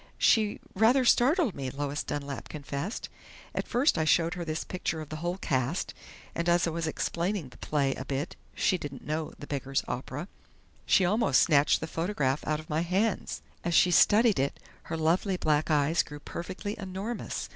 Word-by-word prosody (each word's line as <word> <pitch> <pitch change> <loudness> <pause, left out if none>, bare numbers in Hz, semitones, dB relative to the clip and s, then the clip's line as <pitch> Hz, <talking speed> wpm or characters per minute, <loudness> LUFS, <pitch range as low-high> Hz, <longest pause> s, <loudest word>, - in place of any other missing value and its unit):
"She 215 -2 +3
rather 235 +6 +4
startled 265 - +4
me," 135 -2 -4
Lois 145 +2 -3
Dunlap 140 -1 -5
confessed. 145 - -4 0.5
"I - - 0
first 250 - +2
showed 165 +1 +3
her 175 -1 -4
this 160 -1 -3
picture 180 -3 -3
of 155 -2 -7
the 155 - -5
whole 175 +3 -2
cast, 130 -1 -1 0.4
and 170 +1 -1
as 175 +1 +4
I 165 - -1
was 165 0 -2
explaining 170 0 -2
the - - -17
play 140 -3 0
a - - -6
bit 140 +3 -3 0.2
she 185 - +2
didn't 140 -4 -7
know 155 +1 -2
'The 145 - -8
Beggar's 135 -1 -2
Opera' 135 +6 -4 0.6
she 190 - +5
almost 195 - +4
snatched 145 -2 +4
the - - -2
photograph 160 -5 -1
out 155 0 +1
of 155 - -11
my 155 +1 0
hands. 190 +5 -1 0.2
As 170 -1 0
she 180 - +6
studied 210 - +5
it, 140 +1 -1 0.3
her 165 - -3
lovely 175 +4 +1
black 155 -2 +1
eyes 155 +2 +3
grew 150 0 -9
perfectly 190 +7 -5
enormous. 195 +4 -4
165 Hz, 180 wpm, -29 LUFS, 145-190 Hz, 0.6 s, she